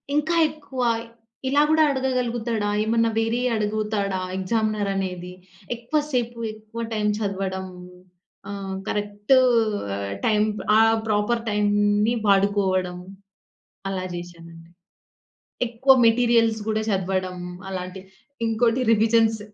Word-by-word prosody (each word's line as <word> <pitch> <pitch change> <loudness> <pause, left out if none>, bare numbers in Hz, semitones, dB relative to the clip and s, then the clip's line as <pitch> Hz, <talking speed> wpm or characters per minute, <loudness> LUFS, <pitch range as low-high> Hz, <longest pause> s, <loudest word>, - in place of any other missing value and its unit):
ఇంకా 315 +3 +1
ఎక్కువ 285 -4 -7 0.7
ఇలా 285 +2 +4
కూడా 315 0 +5
అడగగలుగుతాడ? 245 -4 -1 0.2
ఏమన్నా 230 +1 +2
వేరే 225 +2 +1 0.2
అడుగుతాడ 210 -1 -1 0.2
ఎగ్జామినర్ 215 +1 0
అనేది? 180 -2 -4 0.4
ఎక్కువ 240 +6 -1
సేపు, 240 -3 -1 0.2
ఎక్కువ 215 +2 -9
టైం 210 -1 0
చదవడం. 195 -2 -3 0.8
ఆహ్, 195 -1 -5
కరెక్టు 205 +4 +1 0.9
టైం 210 -1 +3 0.3
ఆహ్, 225 0 +5
ప్రాపర్ 215 +2 +1
టైంని 205 +1 +2
వాడుకోవడం, 195 -2 +2 0.9
అలా 185 -1 -3
చేశానండి. 170 -1 -10 1.0
ఎక్కువ 250 +4 +4
మెటీరియల్స్ 230 -1 +3
కూడా 220 0 0
చదవడం, 185 -1 -1 0.3
అలాంటివి 185 0 -6 0.4
ఇంకోటి 230 +2 +1
రివిజన్స్ 225 0 +3
215 Hz, 95 wpm, -23 LUFS, 195-230 Hz, 1.0 s, కూడా